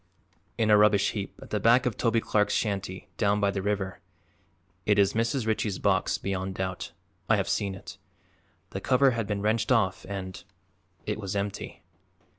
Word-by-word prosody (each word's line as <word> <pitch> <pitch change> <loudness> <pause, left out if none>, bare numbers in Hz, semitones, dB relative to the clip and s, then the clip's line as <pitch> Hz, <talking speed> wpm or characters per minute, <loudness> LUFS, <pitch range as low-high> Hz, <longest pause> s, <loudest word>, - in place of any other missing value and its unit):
"In 110 -1 +2
a 105 - +7
rubbish 105 -1 +4
heap 100 -2 -5
at - - -14
the 105 - 0
back 120 +5 +4
of 120 -4 0
Toby 115 -1 +1
Clark's 105 -1 +1
shanty, 100 -3 -2
down 105 -1 +2
by 100 -1 +2
the 100 -1 -3
river. 100 -1 -2 0.8
It 105 -1 +2
is 100 -1 +4
Mrs. 115 +2 0
Ritchie's 110 -3 0
box, - - +1
beyond 95 -1 -3
doubt; 95 -2 -4 0.4
I - - +6
have - - -1
seen 100 -2 -1
it; 95 - -11 0.7
the - - -5
cover 130 +1 +4
had 115 -3 -2
been 105 -1 -2
wrenched 110 +2 +1
off 95 -6 +2
and 95 -2 -6 0.6
it - - -2
was 100 -2 -4
empty." 100 0 -4
105 Hz, 175 wpm, -27 LUFS, 95-110 Hz, 0.8 s, a